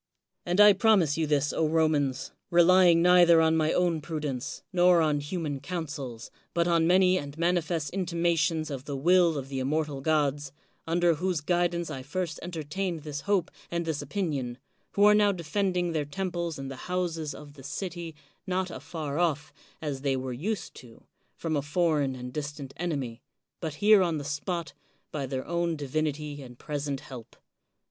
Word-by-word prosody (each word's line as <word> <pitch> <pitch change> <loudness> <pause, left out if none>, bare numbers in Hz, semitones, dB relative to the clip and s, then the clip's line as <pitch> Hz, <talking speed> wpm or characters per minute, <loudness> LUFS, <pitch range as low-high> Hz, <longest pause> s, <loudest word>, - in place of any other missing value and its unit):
And 175 +3 0
I 210 0 +9
promise 195 -7 +3
you 160 -1 0
this, 145 -1 +1
Romans, 155 -4 +1 0.2
relying 175 0 +6
neither 175 -2 +7
on 160 0 +4
my 155 0 +2
own 175 -3 +1
prudence, 150 -5 -4
nor 180 -1 +5
on 155 -2 +2
human 145 -1 -3
counsels, 140 -6 -6 0.2
but 170 0 +2
on 165 -1 +3
many 185 +1 +4
and 145 +1 -8
manifest 170 -3 0
intimations 170 -4 0
of 135 -1 -5
the 140 -2 -4
will 170 +2 +4
of 135 -1 -5
the 135 -1 -4
inmiortal 145 +1 -1
gods; 145 -2 0 0.4
under 170 +1 +3
whose 180 +1 -1
guidance 175 +1 0
I 135 -3 -5
first 165 +5 -4
entertained 170 +1 -4
this 145 -2 -5
hope 195 -2 0 0.2
and 170 0 -2
this 160 -3 -2
opinion; 145 -7 -3 0.4
who 200 - +3
are 210 0 +8
now 210 -1 +4
defending 180 0 -1
their 155 -3 -1
temples 170 0 -3
and 135 0 -6
the 135 - -7
houses 165 -4 -2
of 145 -1 -11
the 140 - -13
city, 170 +2 -5 0.3
not 185 0 -1
afar 150 +1 -5
off, 160 -3 0 0.3
as 140 -3 -3
they 135 -1 0
were 130 -1 -4
used 185 - -3
to, 120 -3 -14 0.3
from 160 -2 -2
a 145 - +1
foreign 150 -3 +1
and 125 0 -7
distant 145 -2 -5
enemy, 140 -9 -3 0.4
but 160 -3 -4
here 205 +5 +6
on 170 -3 +1
the 145 - -5
spot, 160 +4 -3 0.4
by 140 -3 -3
their 130 0 -4
own 170 -1 -1
divinity 150 0 -3
and 125 -2 -11
present 145 -1 -4
help. 125 -3 -11
160 Hz, 170 wpm, -28 LUFS, 145-175 Hz, 0.4 s, I